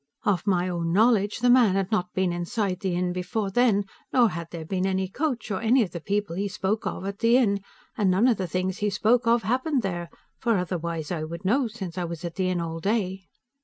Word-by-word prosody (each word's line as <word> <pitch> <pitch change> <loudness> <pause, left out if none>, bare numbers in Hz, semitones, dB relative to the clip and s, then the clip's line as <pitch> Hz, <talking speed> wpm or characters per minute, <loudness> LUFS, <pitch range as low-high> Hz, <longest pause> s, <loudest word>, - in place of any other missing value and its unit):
Of 200 -2 0
my 180 -2 +2
own 170 -2 -2
knowledge, 210 +2 +3
the 245 - +4
man 240 -6 +5
had 195 0 -1
not 180 -4 0
been 185 -2 +1
inside 185 +2 -2
the 190 -4 -1
inn 180 0 0
before 195 +3 -2
then, 215 -3 +3 0.3
nor 240 -3 +5
had 170 -3 -6
there 165 -2 -7
been 185 +2 -1
any 190 0 0
coach, 250 0 -2
or 190 - -2
any 235 +2 +4
of 185 - -5
the 170 - -5
people 200 -1 -1
he 200 +3 -1
spoke 200 +2 -2
of, - - -4
at 200 0 -5
the 230 +1 +5
inn, 200 -6 +2 0.3
and 205 -4 +2
none 190 +7 +4
of 240 -5 +3
the 185 - -2
things 185 +2 -2
he 210 - +1
spoke 230 +4 +2
of 235 0 +3
happened 260 +2 0
there, 175 -3 -3 0.3
for 230 -4 +2
otherwise 170 -3 -3
I 165 -3 -2
would 170 +3 -7
know, 245 +6 +2
since 190 -6 -6
I 175 - -1
was 170 0 -6
at 170 - -4
the 185 0 0
inn 180 -1 0
all 165 -1 -4
day. 190 -1 -1
195 Hz, 240 wpm, -26 LUFS, 180-225 Hz, 0.3 s, man